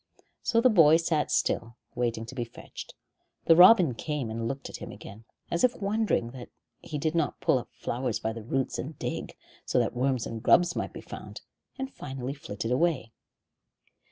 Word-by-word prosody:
So 230 - +2
the 255 - +6
boy 160 -6 +7
sat 160 -2 0
still, 115 +1 0 0.2
waiting 120 -2 -1
to 120 - -9
be 125 -2 -2
fetched. 115 - -10 0.5
The 165 - +7
robin 180 - +8
came 140 -2 -3
and 115 +1 -3
looked 135 +2 -4
at - - -7
him - - -8
again, 110 +3 -11 0.3
as 170 - 0
if 250 - +4
wondering 205 - 0
that 125 -1 -10 0.3
he 150 - -5
did 155 +2 -1
not 165 -3 0
pull 130 - +3
up - - -10
flowers 120 -1 -3
by 110 - -2
the 115 - -7
roots 130 +4 -2
and 145 +2 -6
dig, - - -5 0.3
so - - -1
that - - +1
worms 130 -1 0
and 115 -1 -5
grubs 175 +8 +4
might - - -3
be - - -9
found, - - -9 0.4
and 265 0 -5
finally 130 -1 -5
flitted 115 -5 -5
away. 135 -4 +1
135 Hz, 185 wpm, -28 LUFS, 120-165 Hz, 0.5 s, robin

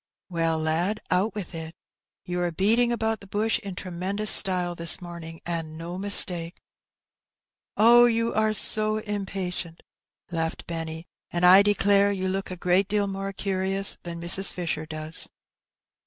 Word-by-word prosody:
" - - -67
Well, 165 -2 -1
lad, 165 +7 -2
out 195 +5 0
with 200 -4 -7
it: 160 0 -8 0.5
you 180 0 -4
are 175 -1 -1
beating 225 +8 +1
about 225 -2 -2
the 200 - -14
bush 215 +3 -1
in 195 -3 -8
tremendous 190 +4 +1
style 180 -3 +4
this 170 -1 +1
morning, 170 -2 -10
and 165 -2 -4
no 170 +2 -7
mistake." 180 -4 +3 0.6
*' - - -67 0.2
Oh, 240 +3 +6
you 230 -1 0
are 220 0 +1
so 215 0 +3
impatient! 190 -5 -6 0.3
" - - -37
laughed 165 -1 -4
Benny; 165 -1 -6
'' - - -53
and 175 +1 0
I 185 +2 +8
declare 200 0 +2
you 190 -1 -3
look 190 +1 -3
a 185 - -6
great 180 +3 +1
deal 205 0 0
more 195 0 -5
curious 195 0 -1
than 170 -1 -7
Mrs. 175 +3 +6
Fisher 160 -3 -5
does." 155 0 -5
185 Hz, 165 wpm, -24 LUFS, 170-205 Hz, 0.6 s, I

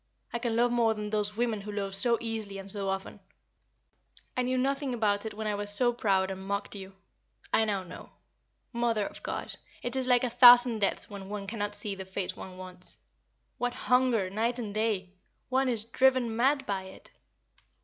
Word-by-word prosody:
I 235 - -1
can 230 -1 -1
love 240 +1 +3
more 230 -2 +2
than 210 0 -5
those 210 0 0
women 230 -3 0
who 210 +1 -7
love 200 -1 -3
so 235 +4 +2
easily 220 -3 -4
and 195 0 -4
so 195 -1 -1
often. 190 0 -4 1.2
I 255 - +1
knew 255 +1 0
nothing 275 0 0
about 210 -2 +1
it 215 - -7
when 220 0 -5
I 210 - 0
was 205 0 0
so 240 +3 +3
proud 195 -4 +1
and 190 0 -6
mocked 200 +1 -3
you. 195 -1 -9 0.6
I 220 - +4
know 200 -3 -1
now. 180 - -11 0.6
Mother 235 -3 +1
of - - -8
God! - - -4 0.3
it 245 +1 -2
is 260 -1 0
like 250 -1 +4
a 250 - +1
thousand 245 -1 +8
deaths 200 - 0
when 195 -2 -9
one 205 -1 -4
cannot 205 0 -3
see 205 - -1
the 190 -1 -6
face 190 0 -3
one 185 -1 -9
wants. 185 -1 -5 0.6
What 245 0 -1
hunger 250 -7 +2
night 230 +4 0
and 220 -4 -5
day! 210 -4 -1 0.4
one 265 0 +2
is 225 -3 +2
driven 255 -1 +2
mad 270 +3 +2
by 195 -2 -2
it!" 190 - -12
215 Hz, 195 wpm, -29 LUFS, 200-240 Hz, 1.2 s, thousand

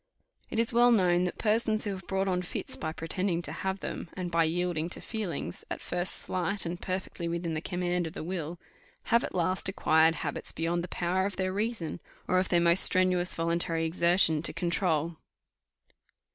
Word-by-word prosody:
It - - -4
is 230 +1 +2
well 240 +1 +6
known 180 -5 +3
that 180 - -3
persons 220 0 +1
have 190 -3 -5
brought 195 0 0
on 180 -1 +1
fits 180 - -4
by 155 - -4
pretending 170 +2 -2
to - - -4
have 190 0 -3
them; - - -5
and 180 -2 -4
by 165 -1 +3
yielding 170 0 -1
to - - -5
feelings, 215 -7 -4
at - - -4
first 175 +1 -1
slight 190 +2 -2
and 170 +1 -4
perfectly 185 -2 -4
within 170 0 -2
the 155 - -2
command 175 -1 -1
of 160 - -8
the - - -6
will, 170 -1 -4 0.5
have 235 - +5
at - - -5
last 185 +2 0
acquired 160 -3 +3
habits - - -3
beyond 170 +1 -1
the - - -5
power 180 +2 0
of 200 - -6
their 185 0 -1
reason, 205 -5 -2 0.3
or 185 - +3
of 185 - -1
their 175 - +4
most 170 +2 +6
strenuous 185 -1 +4
voluntary 165 0 +1
exertion, 170 -1 +3
to - - +2
control. 170 -2 0
180 Hz, 185 wpm, -29 LUFS, 170-190 Hz, 0.5 s, well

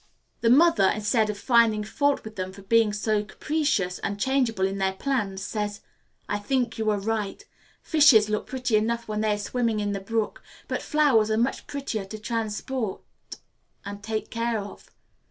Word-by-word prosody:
The 230 - +2
mother, 265 - +5
instead 215 +1 +1
of 210 - -3
finding 225 -2 +3
fault 285 +6 0
with 220 0 -9
them 185 0 -4
for 200 0 -12
being 225 +1 +3
so 210 0 0
capricious 215 - -1
and 200 0 -3
changeable 240 -5 +1
in 195 +1 -2
their 190 0 +1
plans, 195 -4 -2
says, 205 0 -3 0.5
"I 205 - -1
think 245 +2 -1
you 220 -1 +1
are 210 - +2
right. 210 0 -3 0.4
Fishes 285 -10 +6
look 210 0 -2
pretty 250 -4 -1
enough 235 +2 -1
when 215 0 -2
they 215 -1 +2
are - - -5
swimming 225 +1 -1
in 205 -1 -1
the 200 - -2
brook, 220 +2 -2 0.3
but - - -2
flowers 275 -9 +3
are 220 - +1
much 240 +4 -1
prettier 270 -8 -4
to 215 +3 -8
transport 225 0 -3 0.8
and 205 0 -7
take 215 +1 -4
care 230 0 -1
of. 205 -1 -8
215 Hz, 175 wpm, -26 LUFS, 205-235 Hz, 0.8 s, Fishes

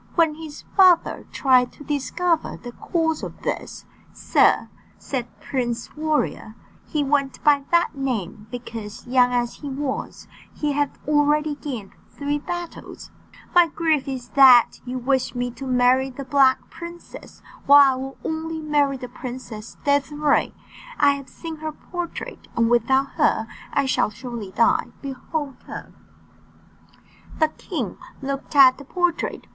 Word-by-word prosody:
When 330 -3 +4
his 310 -1 -9
father 370 -4 +4
tried 255 -2 +3
to - - -12
discover 315 +4 -1
the 245 - -9
cause 320 +4 -1
of - - -8
this - - -4 0.3
"Sir," - - +3 0.3
said 250 -4 -4
Prince 240 -3 -3
Warrior 305 -7 -1 0.3
(he 300 -2 0
went 275 -1 0
by 285 -2 +4
that 340 -1 +3
name, 220 - -3
because, 225 -3 -7
young 250 0 +3
as 240 -1 -1
he 290 - -7
was, 270 0 -4 0.2
he 300 -1 -2
had 290 0 +1 0.2
already 300 0 +2
gained 250 -9 -6 0.2
three 290 +1 -2
battles), 350 +3 -7 0.4
"my 350 -1 +6
grief 315 -3 0
is 260 -3 -5
that 260 -4 +6
you 255 +1 -4
wish 260 0 0
me 245 0 -2
to 270 +3 -8
marry 255 +1 +3
the 265 +1 -8
Black 270 -2 +3
Princess, 340 0 -11 0.2
while 280 -1 +8
I - - -3
will 270 +1 -6
only 320 0 -3
marry 290 -3 +1
the 250 -1 -7
Princess 240 -3 -8
Désirée. 285 +1 +2 0.5
I 285 -1 +6
have 280 -1 -5
seen 325 -2 -8
her 310 0 -4
portrait, 350 +2 -7
and 230 0 +3
without 265 +4 +3
her 220 - +2 0.3
I 280 - +1
shall 260 - +2
surely 230 -2 -7
die. 230 +4 +2 0.2
Behold 275 +1 -4
her!" - - -8 1.4
The 315 -1 +3
king - - -5 0.2
looked 275 +2 -5
at 265 -2 +7
the - - -9
portrait. 355 +2 -1
275 Hz, 140 wpm, -23 LUFS, 250-300 Hz, 1.4 s, while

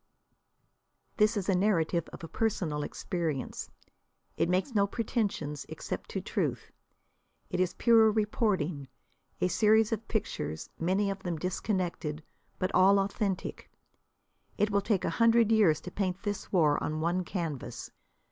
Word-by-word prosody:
This 215 0 +3
is 195 - -2
a 195 - +3
narrative 180 -3 +1
of - - -10
personal 175 -9 0
experience. 160 -3 -3 0.7
It - - +1
makes 185 +8 0
no 200 -2 +3
pretensions, 200 - -2
except - - -6
to - - -3
truth. - - -2 0.8
It 180 - -1
is 185 -1 +1
pure 225 -2 +5
reporting, 195 - 0 0.5
a - - +3
series 215 +3 +4
of 225 0 -3
pictures, 80 - -3
many 190 +4 +1
of 195 0 -6
them 175 -3 -3
disconnected, 180 -3 -2 0.3
but 185 - -2
all 190 +2 +6
authentic. 195 -1 -2 0.9
It 210 0 +2
will 200 0 +2
take 200 -2 0
a - - 0
hundred 230 -1 +5
years 195 -9 +4
to 180 - -8
paint 190 0 -2
this 205 -2 -4
war 155 -6 +3
on 155 +1 -2
one 175 +3 +1
canvas. 155 - -5
190 Hz, 140 wpm, -30 LUFS, 170-210 Hz, 0.9 s, all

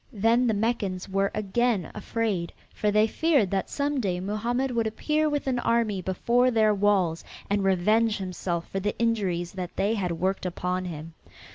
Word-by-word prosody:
Then 230 +3 +2
the 220 - +2
Meccans 205 -4 -1
were 195 0 +1
again 215 -1 0
afraid, 210 -5 -2 0.2
for 210 - 0
they 210 +1 +4
feared 275 - +2
that 195 -2 -1
some 285 0 -1
day 185 -6 -1
Mohammed 235 +7 -1
would 230 -2 0
appear 300 +8 0
with 290 -1 -2
an 255 -2 0
army 230 -5 +1
before 235 +7 +2
their 220 -3 +3
walls 195 -5 +1 0.3
and 200 -1 +2
revenge 210 +4 +2
himself 180 -3 -3
for 195 - -2
the 205 +2 -2
injuries 190 -7 0
that 180 -2 -6
they 205 +3 +1
had 185 -6 -1
worked 185 +2 -1
upon 180 +1 -2
him. 165 -1 -7
205 Hz, 170 wpm, -26 LUFS, 185-230 Hz, 0.3 s, they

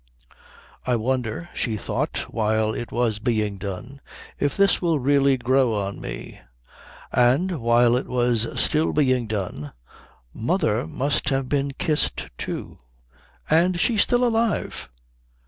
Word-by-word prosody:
"I 125 - +1
wonder," 125 +6 -2
she 110 -4 -1
thought - - -2
while 110 0 0
it 120 - -5
was 115 -3 0
being 105 -3 -1
done, 105 +8 -7 0.4
"if 145 -1 0
this 200 0 +3
will 170 -3 +2
really 140 0 +3
grow 130 -2 +2
on 100 -1 -3
me...." - - -7 0.7
And, 135 +7 +2
while 120 +1 +4
it 125 - -2
was 120 -2 +1
still 155 +1 +2
being 130 -5 +2
done, 90 -9 -4 0.6
"Mother - - 0
must 135 - -1
have 135 -1 0
been 140 0 -1
kissed, 150 +2 -1
too, - - -5 0.7
and 175 +3 +3
she's 215 +3 +3
still 245 0 +3
alive...." 230 -2 -1
125 Hz, 130 wpm, -23 LUFS, 110-145 Hz, 0.7 s, while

